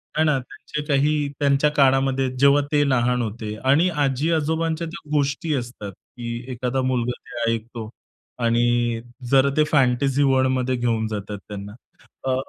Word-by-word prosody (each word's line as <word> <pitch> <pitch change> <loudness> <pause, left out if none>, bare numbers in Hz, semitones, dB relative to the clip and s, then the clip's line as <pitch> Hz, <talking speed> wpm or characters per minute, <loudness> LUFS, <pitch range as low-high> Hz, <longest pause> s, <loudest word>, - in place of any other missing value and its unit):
आहे 155 - +3
ना. 150 -3 +3
त्यांचे 150 +4 -7
काही 145 0 +2 0.3
त्यांच्या 140 +1 +3
काळामध्ये, 135 -1 +2
जेव्हा 140 +1 +5
ते 145 -1 +3
लहान 125 -1 +2
होते. 110 -1 -4
आणि 155 +7 +4
आजी-आजोबांच्या 160 +4 0
त्या 160 -2 -10
गोष्टी 145 +3 0
असतात, 120 -5 -5 0.3
की 120 -1 -4
एखादा 125 +1 -1
मुलगा 125 -2 0
ते 115 -1 -2
ऐकतो. 115 0 -6 0.5
आणि 120 0 +1 0.3
जरा 135 0 +5
ते 155 - +6
फॅन्टसी 135 0 +3
वर्ल्डमध्ये 130 -1 +2
घेऊन 115 -2 0
जातात 105 -1 -5
त्यांना. 100 -1 -7 0.5
अ, 130 -1 +1
130 Hz, 140 wpm, -23 LUFS, 120-145 Hz, 0.5 s, ते